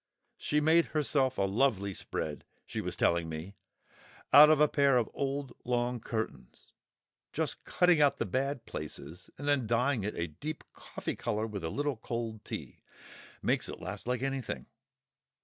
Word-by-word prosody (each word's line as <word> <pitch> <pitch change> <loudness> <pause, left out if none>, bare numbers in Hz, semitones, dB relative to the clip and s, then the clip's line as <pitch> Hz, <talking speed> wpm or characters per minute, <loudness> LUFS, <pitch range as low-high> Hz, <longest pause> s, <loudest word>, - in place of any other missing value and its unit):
She's 150 0 +1
made 165 +2 +5
herself 135 -3 +2
a - - +2
lovely 100 -1 +1
spread, 75 -4 -4 0.2
she - - -4
was - - -3
telling 85 -1 +2
me, 80 +5 -6 0.8
out 150 +2 +11
of 155 -2 +5
a 150 - +6
pair 140 -3 +4
of 115 -3 +2
old 140 0 -2
long 120 0 0
curtains, 110 0 -5 0.6
just - - -2
cutting 180 -3 +4
out 145 -1 +4
the - - -1
bad 135 -1 -1
places 90 +3 -7
and 145 - -6
then 140 -5 +2
dyeing 120 0 +2
it 105 - -3
a 85 - -1
deep 150 - -6
coffee - - -5
colour 110 +1 -1
with 105 -5 -5
a 80 - -1
little 145 - -1
cold 115 -1 -4
tea; - - -7 0.6
makes - - +1
it - - -7
last 95 +5 -6
like 125 0 -1
anything. 135 -2 -3
125 Hz, 165 wpm, -31 LUFS, 105-140 Hz, 0.8 s, out